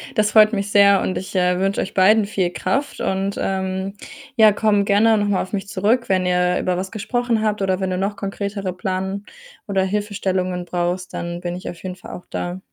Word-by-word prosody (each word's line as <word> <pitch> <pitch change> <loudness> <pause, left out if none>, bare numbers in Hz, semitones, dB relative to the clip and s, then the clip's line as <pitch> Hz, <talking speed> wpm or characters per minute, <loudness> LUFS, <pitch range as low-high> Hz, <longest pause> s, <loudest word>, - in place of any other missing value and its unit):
Das 210 0 +2
freut 215 0 +7
mich 200 0 -1
sehr, 200 -1 +6
und 185 - -2
ich, 190 - -6
äh, 180 0 +2
wünsche 195 +1 0
euch 190 - -5
beiden 205 +3 +5
viel 185 -4 -1
Kraft 280 +8 -2
und, 195 +1 -1
ähm, 190 0 -2 0.4
ja, 220 -2 +7
komm 205 -1 +2
gerne 215 +2 +4
noch 205 0 0
mal 200 -2 +1
auf 190 - -7
mich 200 0 -3
zurück, 215 +5 +1
wenn 185 -1 +2
ihr 180 0 +2
über 180 -1 -1
was 190 +1 -4
gesprochen 235 +1 -1
habt 210 -2 0
oder 190 -1 +1
wenn 190 -1 -1
du 180 - -1
noch 200 +2 -1
konkretere 200 -1 -4
Plan 190 +2 -3 0.4
oder 195 -1 +1
Hilfestellungen 190 -3 -2
brauchst, 180 +1 -2
dann 170 0 -4
bin 175 0 -3
ich 180 - -6
auf 170 - -9
jeden 185 -1 -5
Fall 180 - -12
auch 180 - -9
da. 175 +1 -4
195 Hz, 210 wpm, -21 LUFS, 185-205 Hz, 0.4 s, freut